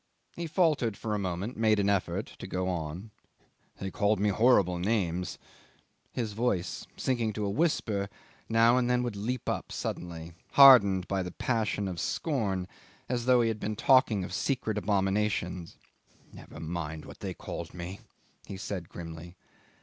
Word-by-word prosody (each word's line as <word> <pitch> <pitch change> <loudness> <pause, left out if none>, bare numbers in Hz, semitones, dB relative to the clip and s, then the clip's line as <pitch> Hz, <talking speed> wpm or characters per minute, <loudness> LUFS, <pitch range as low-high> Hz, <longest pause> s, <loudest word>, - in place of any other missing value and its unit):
He 170 -1 -4
faltered 150 - +1
for 110 -2 -3
a 105 - 0
moment, 95 +4 -3
and 115 - -7
made 110 -1 +4
an 100 -1 +1
effort 100 -2 0
to - - -7
go 90 0 -2
on. 90 +4 -4 0.7
"They 95 0 -5
called 105 +2 +1
me 105 +1 +2
horrible 100 -5 +4
names." 90 -3 -1 0.7
His 115 -4 -3
voice, 105 -5 -1
sinking 120 -4 0
to 105 0 -2
a 100 - -1
whisper, 105 -9 0 0.4
now 115 +2 +5
and 125 -1 0
then 125 0 +2
would 120 -4 -3
leap 115 +5 -3
up - - -2
suddenly, 85 -1 -5 0.2
hardened 100 -10 +8
by 95 -1 0
the 90 - -4
passion 110 0 -1
of 90 -3 -4
scorn, 100 - -1 0.4
as 120 -1 -2
though 125 -1 +5
he 115 - +2
had 110 -1 -3
been 105 +1 -3
talking 110 -4 +4
of - - -6
secret 125 -6 -1
abominations. 95 -4 -1 0.6
"Never - - -11
mind 80 -1 -5
what - - -12
they - - -5
called - - -6
me," 90 +2 -6 0.5
he 100 - -6
said 95 -3 -5
grimly. 85 +1 -9
100 Hz, 165 wpm, -29 LUFS, 90-115 Hz, 0.7 s, hardened